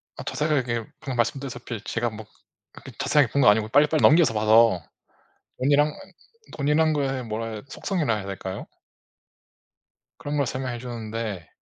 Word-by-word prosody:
아 - - -8
자세하게 130 -7 -1
방금 135 -5 -5
말씀드렸다시피 120 -2 -3
제가 120 +1 -1
뭐 110 0 -9 0.5
그렇게 - - -12
자세하게 145 -6 +2
본 140 - +2
거 105 - +7
아니고 105 +1 +3
빨리빨리 150 +5 +3
넘겨서 155 -5 +5
봐서 110 -3 +4 0.8
돈이란 145 +3 +3 0.6
돈이라는 155 +2 +2
거의 135 -4 -1
뭐라 110 -1 -5
속성이라 155 - -1
해야 100 -2 -6
될까요? 95 -1 -6 1.5
그런 145 +1 -4
걸 140 - +2
설명해 130 -2 -4
주는데 115 -6 -5
120 Hz, 345 characters per minute, -25 LUFS, 110-145 Hz, 1.5 s, 거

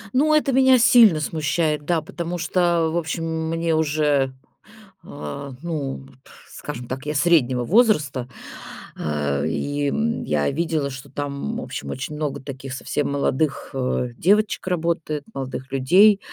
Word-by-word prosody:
Ну, 305 +4 +4
это 295 -3 +2
меня 260 0 +6
сильно 225 -7 +6
смущает, 150 0 -1
да, 165 -1 0
потому 170 +2 -5
что, 170 -1 +1
в - - 0
общем, 165 0 -2 0.2
мне 165 0 0
уже, 145 -3 +1 0.7
а, 140 -1 -7
ну, 145 -5 -4 0.5
скажем 125 -5 -7
так, 130 +2 -5
я 150 +1 -3
среднего 140 -6 +3
возраста, 150 - +2 0.7
а, 75 -2 -1
и, 145 - -1
м, 230 +8 -1
я 75 -1 0
видела, 155 -1 -1
что 130 +1 -9
там, 145 - -4
в - - -4
общем, - - -6
очень 135 +3 -5
много 145 -2 -3
таких 135 -1 -7
совсем 140 +2 -2
молодых, 140 +1 -1
э, 125 -1 -1
девочек 205 +2 +2
работает, 165 -4 -1
молодых 130 -1 -6
людей. 185 +11 +5
150 Hz, 140 wpm, -22 LUFS, 135-170 Hz, 0.7 s, меня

